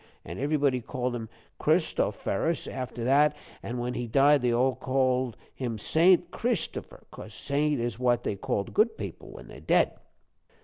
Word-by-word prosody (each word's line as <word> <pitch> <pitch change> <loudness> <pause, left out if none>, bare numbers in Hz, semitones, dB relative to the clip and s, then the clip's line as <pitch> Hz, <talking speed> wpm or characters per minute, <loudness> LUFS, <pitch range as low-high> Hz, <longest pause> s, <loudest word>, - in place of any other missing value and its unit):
An' 85 +3 -7
everybody 140 -2 +1
called 125 +1 -3
him 115 -2 -6 0.3
Christofferus 160 +11 0
after 125 -2 -5
that, 145 +4 +4 0.3
an' 120 - -5
when 120 +1 -2
he 120 -1 -3
died 140 +4 +4
they 125 - +1
called 130 0 +1 0.2
him 120 -4 -4
Saint 175 - +3
Christopher, 230 -9 -3
cos 110 -1 -10
Saint 145 +2 0
is 120 -1 -3
what 120 -1 +2
they - - -1
called 100 0 -3
good 220 +1 +2
people - - -7
when - - -11
they're - - -11
dead." - - +2
130 Hz, 150 wpm, -28 LUFS, 120-145 Hz, 0.3 s, that